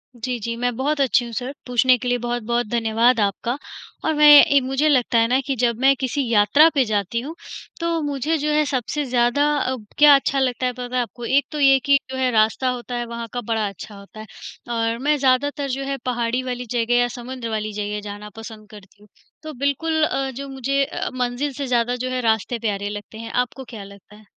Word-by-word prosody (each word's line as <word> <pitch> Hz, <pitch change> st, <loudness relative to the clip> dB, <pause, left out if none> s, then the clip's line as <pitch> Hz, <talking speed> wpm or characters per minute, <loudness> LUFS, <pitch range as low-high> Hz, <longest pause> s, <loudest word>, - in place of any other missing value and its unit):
जी, 245 Hz, +1 st, -4 dB
जी, 230 Hz, +2 st, -4 dB
मैं 245 Hz, 0 st, -1 dB
बहुत 280 Hz, +3 st, -1 dB
अच्छी 250 Hz, -2 st, +2 dB
हूँ 235 Hz, -, -8 dB
सर, 250 Hz, +5 st, -4 dB
पूछने 250 Hz, +1 st, +3 dB
के 250 Hz, -, -6 dB
लिए 245 Hz, -, +1 dB
बहुत-बहुत 240 Hz, -1 st, -2 dB
धन्यवाद 230 Hz, +1 st, +2 dB
आपका। 210 Hz, +6 st, -1 dB, 0.5 s
और 315 Hz, -, +2 dB
मैं 300 Hz, 0 st, +7 dB, 0.2 s
ए 280 Hz, 0 st, +4 dB
मुझे 270 Hz, +4 st, 0 dB
लगता 250 Hz, -4 st, +2 dB
है 230 Hz, -, +3 dB
ना 255 Hz, +3 st, +2 dB
कि 275 Hz, -, 0 dB
जब 235 Hz, -2 st, 0 dB
मैं 270 Hz, +1 st, +4 dB
किसी 265 Hz, +1 st, -1 dB
यात्रा 230 Hz, +8 st, +5 dB
पे 270 Hz, -, +4 dB
जाती 210 Hz, 0 st, -1 dB
हूँ, 300 Hz, +6 st, -7 dB, 0.4 s
तो 335 Hz, -1 st, -1 dB
मुझे 290 Hz, +2 st, -1 dB
जो 300 Hz, 0 st, -1 dB
है 305 Hz, 0 st, +3 dB
सबसे 275 Hz, +2 st, -2 dB
ज़्यादा 245 Hz, +2 st, +2 dB
अब 255 Hz, -6 st, -3 dB
क्या 295 Hz, -1 st, +8 dB
अच्छा 275 Hz, 0 st, 0 dB
लगता 255 Hz, -1 st, 0 dB
है, 250 Hz, -, 0 dB
पता 245 Hz, 0 st, -6 dB
है 250 Hz, -, +2 dB
आपको? 240 Hz, +1 st, -7 dB
एक 275 Hz, +2 st, +2 dB
तो 300 Hz, -, -4 dB
ये 270 Hz, -1 st, +5 dB
कि 280 Hz, -1 st, +5 dB
जो 260 Hz, -, -4 dB
है 260 Hz, -1 st, +1 dB
रास्ता 220 Hz, +3 st, +2 dB
होता 245 Hz, -1 st, -5 dB
है 240 Hz, 0 st, -2 dB
वहाँ 235 Hz, 0 st, -6 dB
का 245 Hz, -, -3 dB
बड़ा 220 Hz, -2 st, -1 dB
अच्छा 200 Hz, +2 st, -9 dB
होता 200 Hz, +3 st, -13 dB
है 215 Hz, -, -8 dB, 0.5 s
और 230 Hz, 0 st, 0 dB
मैं 300 Hz, 0 st, +3 dB
ज़्यादातर 280 Hz, +2 st, +1 dB
जो 270 Hz, +1 st, -3 dB
है 275 Hz, 0 st, -3 dB
पहाड़ी 245 Hz, 0 st, -1 dB
वाली 250 Hz, -1 st, -4 dB
जगह 240 Hz, -1 st, 0 dB
या 245 Hz, -, +3 dB
समुद्र 245 Hz, -1 st, -6 dB
वाली 215 Hz, -1 st, -3 dB
जगह 210 Hz, 0 st, -3 dB
जाना 205 Hz, +1 st, -8 dB
पसंद 220 Hz, -1 st, -10 dB
करती 205 Hz, -1 st, -16 dB
हूँ। 210 Hz, -, -19 dB, 0.4 s
तो 310 Hz, 0 st, -7 dB
बिल्कुल 300 Hz, +4 st, 0 dB
अ, 270 Hz, -3 st, 0 dB
जो 275 Hz, +2 st, -7 dB
मुझे 270 Hz, +1 st, 0 dB
अ, -, -, -4 dB
मंज़िल 250 Hz, +3 st, -2 dB
से 275 Hz, +1 st, -5 dB
ज़्यादा 245 Hz, 0 st, +1 dB
जो -, -, -2 dB
है 255 Hz, 0 st, -2 dB
रास्ते 225 Hz, +1 st, 0 dB
प्यारे 205 Hz, -2 st, -2 dB
लगते 205 Hz, +1 st, -8 dB
हैं। 230 Hz, +1 st, -7 dB
आपको 250 Hz, +2 st, -2 dB
क्या 210 Hz, -3 st, -7 dB
लगता 200 Hz, +1 st, -15 dB
है? 215 Hz, 0 st, -18 dB
245 Hz, 225 wpm, -21 LUFS, 225-270 Hz, 0.5 s, क्या